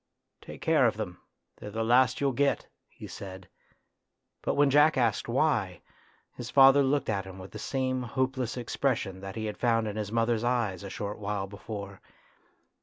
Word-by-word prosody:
"Take - - -11
care - - +4
of - - -1
them, - - -5 0.4
they're 105 - -8
the 110 +2 -2
last 125 +2 +4
you'll 140 -1 +2
get," 140 +3 +1 0.2
he - - -11
said; 95 -2 -9 0.9
but - - -1
when 145 -1 +4
Jack 150 +2 +5
asked 115 -4 +1
why, 120 - 0 0.5
his 120 -1 -7
father 135 +1 +7
looked 140 +1 +1
at 100 -3 -1
him 95 0 -10
with 95 0 -10
the 105 - -8
same 130 +1 -1
hopeless 130 0 -2
expression 120 -5 -1
that 95 0 -7
he 110 -1 -3
had 105 -1 -5
found 115 -2 +2
in 105 0 -4
his 105 -1 -3
mother's 115 0 +1
eyes 115 -7 0
a 100 - -6
short 100 +2 -5
while 100 -1 -2
before. 100 0 -8
115 Hz, 180 wpm, -29 LUFS, 100-130 Hz, 0.9 s, father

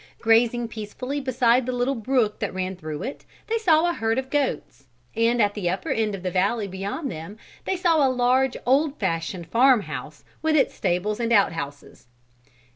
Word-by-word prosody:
Grazing 235 +1 +3
peacefully 230 +6 -5
beside 255 -1 +2
a - - +1
little 250 +2 0
brook 235 -3 0
that - - -3
ran 185 0 -3
through 155 -4 -6
it, 275 - -6 0.2
they 455 +1 -1
saw 335 -5 +4
a 345 - +1
herd 225 -4 -1
of 265 0 -3
goats. 265 - -2 0.3
And 230 +2 +2
at 205 -2 +3
the 195 -5 -2
upper 185 +1 -3
end 215 -2 0
of 190 - -10
the 185 - -2
valley 200 +4 0
beyond 200 - -4
them 165 +7 -8 0.3
they 380 - 0
saw 330 -4 +3
a 270 - +4
large 255 +1 +2
old 285 +3 +2
fashioned 165 -2 -2
farmhouse 175 - +1 0.2
with 315 0 +1
its 285 - +3
stables 190 +5 -1
and 235 -1 -1
outhouses. 165 - -1
230 Hz, 180 wpm, -24 LUFS, 190-265 Hz, 0.3 s, saw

